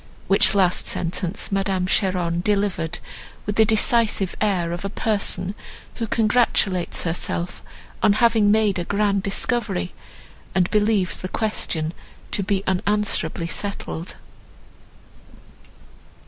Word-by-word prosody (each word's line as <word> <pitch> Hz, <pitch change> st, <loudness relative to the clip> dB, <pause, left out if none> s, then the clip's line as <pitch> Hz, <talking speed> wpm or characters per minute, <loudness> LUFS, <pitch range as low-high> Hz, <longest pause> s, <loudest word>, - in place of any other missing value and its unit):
—which 195 Hz, 0 st, +4 dB
last 185 Hz, -3 st, +2 dB
sentence 180 Hz, +3 st, -2 dB
Madame 195 Hz, -2 st, 0 dB
Cheron 180 Hz, -3 st, +1 dB
delivered 195 Hz, -5 st, 0 dB, 0.5 s
with 205 Hz, -, -2 dB
the 220 Hz, -, +5 dB
decisive 220 Hz, -3 st, +2 dB
air 185 Hz, -5 st, +1 dB
of 175 Hz, +2 st, -5 dB
a 200 Hz, -, -2 dB
person 200 Hz, -3 st, -1 dB, 0.4 s
who 230 Hz, -, -2 dB
congratulates 215 Hz, -5 st, +1 dB
herself 170 Hz, +1 st, -3 dB, 0.4 s
on 205 Hz, -, +5 dB
having 225 Hz, -1 st, +3 dB
made 210 Hz, -3 st, +3 dB
a -, -, -1 dB
grand 200 Hz, +1 st, +1 dB
discovery, 200 Hz, -2 st, 0 dB, 0.6 s
and 185 Hz, -1 st, +2 dB
believes 210 Hz, -3 st, +2 dB
the 185 Hz, -, -6 dB
question 170 Hz, -8 st, -2 dB, 0.4 s
to -, -, +1 dB
be 195 Hz, 0 st, -1 dB
unanswerably 190 Hz, -3 st, +1 dB
settled. 175 Hz, -2 st, -5 dB
195 Hz, 110 wpm, -22 LUFS, 180-210 Hz, 0.6 s, the